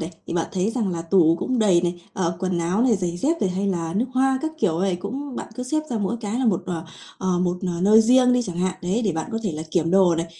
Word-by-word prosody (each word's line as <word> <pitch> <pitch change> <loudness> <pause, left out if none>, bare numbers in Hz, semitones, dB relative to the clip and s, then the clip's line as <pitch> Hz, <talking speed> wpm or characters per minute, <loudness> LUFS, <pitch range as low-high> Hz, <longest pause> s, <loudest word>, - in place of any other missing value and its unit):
này, 160 +1 -4 0.2
thì - - -4
bạn 170 -2 0
thấy 190 +3 0
rằng 230 -4 -1
là 165 -1 -4
tủ 165 -1 +4
cũng 255 +6 -1
đầy 195 -6 +4
này, 175 0 -3
ờ, 170 -3 -1
quần 185 -1 -1
áo 175 +6 +1
này, 245 -4 +3
giày 175 -2 -3
dép 315 - 0
này 190 - +1
hay 190 +2 -2
là 170 -4 -2
nước 230 - +2
hoa 265 0 +2
các 315 0 -2
kiểu 170 - +1
này 190 -2 +1
cũng 255 +8 -6
bạn - - -5
cứ 250 - -5
xếp 310 +5 0
ra 235 - -1
mỗi 205 +3 -1
cái 215 +1 -3
là 260 - +1
một, 195 -6 +1
ờ, 165 -2 -4 0.3
ờ, 185 -1 0
một, 180 0 0 0.2
ờ, 170 - -4
nơi 210 +4 +6
riêng 250 +2 +5
đi 250 0 +2
chẳng 180 -7 -6
hạn, 185 +1 0
đấy, 190 +7 0
để 195 - +1
bạn 160 0 -4
có 225 - -1
thể 200 -6 -2
là 155 0 -5
kiểm 165 -1 +1
đồ 185 -2 +5
này. 165 +1 -2
190 Hz, 295 wpm, -23 LUFS, 175-230 Hz, 0.3 s, nơi